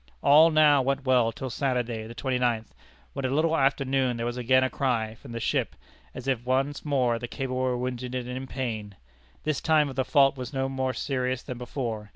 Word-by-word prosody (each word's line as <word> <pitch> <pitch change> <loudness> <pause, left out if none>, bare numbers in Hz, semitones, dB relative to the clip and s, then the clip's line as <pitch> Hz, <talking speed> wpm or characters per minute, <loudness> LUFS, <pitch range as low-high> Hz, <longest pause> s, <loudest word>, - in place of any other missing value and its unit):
All 155 +3 +7
now 150 -3 +5
went 135 +1 -1
well 125 -3 +3
till 130 +3 -6
Saturday, 120 -5 -2
the 115 - -10
twenty 130 -2 -1
ninth, 115 -3 -1 0.4
when 140 - -4
a 130 - 0
little 155 +4 +2
after 135 -1 +2
noon 130 -2 +1
there 115 - -3
was 120 0 -2
again 130 +1 +3
a 130 - +1
cry 115 -5 -1
from 120 +2 -13
the 115 - -4
ship, - - -1 0.4
as 130 - -7
if 130 -3 0
once 135 +3 0
more 125 -5 +1
the 120 - -5
cable 130 0 -4
were 130 -1 0
wounded 125 0 -4
and 125 -1 -3
in 130 +1 -5
pain. 110 -7 -4 0.5
This 155 -3 -1
time 150 -4 +2
the 130 0 0
fault 135 0 +4
was 125 +2 -6
more 135 -1 -1
serious 130 0 -2
than 125 -3 -7
before. 115 -4 -4
130 Hz, 205 wpm, -27 LUFS, 120-135 Hz, 0.5 s, All